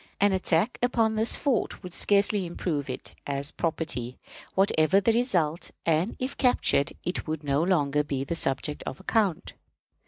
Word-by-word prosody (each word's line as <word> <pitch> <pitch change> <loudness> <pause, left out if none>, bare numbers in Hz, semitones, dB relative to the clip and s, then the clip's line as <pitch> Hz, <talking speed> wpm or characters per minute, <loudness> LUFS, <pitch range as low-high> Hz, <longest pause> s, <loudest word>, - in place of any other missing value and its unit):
An 205 0 +4
attack 185 +4 +1
upon 230 -2 +2
this 220 +1 +3
fort 260 -7 -1
would 180 -1 -8
scarcely 200 -1 +3
improve 155 -4 -3
it 130 - -6
as 140 +1 -1
property, 155 -7 -3 0.4
whatever 190 -2 +3
the 225 +3 +2
result; 175 - 0 0.2
and, 165 +5 +1
if 255 +2 -4
captured, 245 - +2
it 180 - -3
would 155 -1 -3
no 140 +1 +1
longer 150 -5 +2
be 140 -2 -3
the 155 +5 -3
subject 145 0 0
of - - -5
account. 205 -8 0
170 Hz, 155 wpm, -27 LUFS, 150-205 Hz, 0.4 s, An